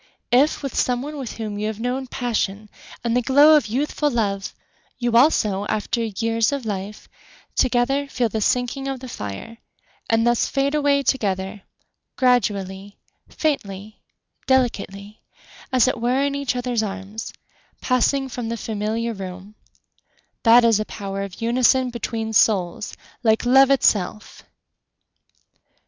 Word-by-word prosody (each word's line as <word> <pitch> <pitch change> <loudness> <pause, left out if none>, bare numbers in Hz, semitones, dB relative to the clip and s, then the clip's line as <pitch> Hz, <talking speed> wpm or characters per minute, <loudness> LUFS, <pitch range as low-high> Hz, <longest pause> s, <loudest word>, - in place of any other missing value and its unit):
If 275 +5 +3
with 275 - -4
some 250 0 0
one 300 +2 -6
with 255 -4 -5
whom 210 -2 -4
you 210 - -1
have 215 -1 -5
known 255 +3 -2
passion 215 -4 -2 0.3
And 235 0 0
the 250 - +3
glow 285 +5 +6
of 295 -7 +2
youthful 295 +5 0
love, 200 -6 -2 0.4
You 240 -1 -1
also, 215 -7 +3
after 230 +3 -1
years 225 +2 0
of 280 -4 -3
life 205 0 -5 0.5
Together, 260 +3 +1
feel 250 -3 0
the 220 0 -3
sinking 250 +4 0
of 270 -1 -3
the 260 - -9
fire 225 - -7 0.5
And 225 0 +3
thus 240 -1 +2
fade 275 +1 0
away 285 -2 +2
together, 200 -6 -1 0.5
Gradually, 200 -6 0 0.3
faintly, 210 - -3 0.5
delicately, 210 -5 -1 0.5
As 255 -2 +4
it 255 -3 -1
were 250 +3 +1
in 280 0 0
each 280 -2 -2
other's 245 -2 -1
arms, 205 +1 -5 0.5
Passing 270 +2 +1
from 245 -2 -5
the 230 - -3
familiar 220 +2 -2
room— 190 0 -8 0.9
That 235 +1 +6
is 225 -2 +4
a 215 - -2
power 195 -2 -5
of 195 0 -7
unison 250 +2 +3
between 225 -1 -4
souls 195 -3 +1 0.2
Like 220 -1 +2
love 265 +2 +6
itself! 215 -6 +1
230 Hz, 140 wpm, -22 LUFS, 210-260 Hz, 0.9 s, glow